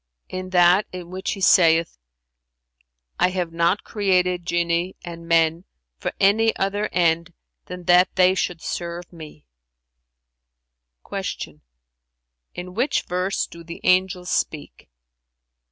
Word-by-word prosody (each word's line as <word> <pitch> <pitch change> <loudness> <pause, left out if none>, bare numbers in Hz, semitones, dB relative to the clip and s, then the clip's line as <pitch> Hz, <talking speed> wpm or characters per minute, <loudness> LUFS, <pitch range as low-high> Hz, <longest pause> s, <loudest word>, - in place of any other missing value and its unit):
"In 185 0 -5
that 180 +2 +4
in 180 -1 -8
which 190 +1 -3
he 195 - -8
saith, 165 - +4 1.2
'I - - +4
have 180 -3 -3
not 170 +4 +1
created 180 -4 0
Genii 170 +1 0
and 170 -1 -9
men 165 +1 +2 0.3
for - - -3
any 220 +3 +3
other 205 +2 -1
end 170 0 +1 0.3
than 180 0 -8
that 180 +1 +5
they 185 0 +5
should 180 -3 -3
serve 170 0 -5
me.'"[FN#360] 60 - -12
Q 75 -1 -9 0.9
"In 180 +1 -7
which 245 +8 0
verse 180 +2 -1
do 170 0 -13
the 170 0 -9
angels 185 0 +1
speak?" 150 - -3
175 Hz, 120 wpm, -22 LUFS, 160-185 Hz, 1.2 s, that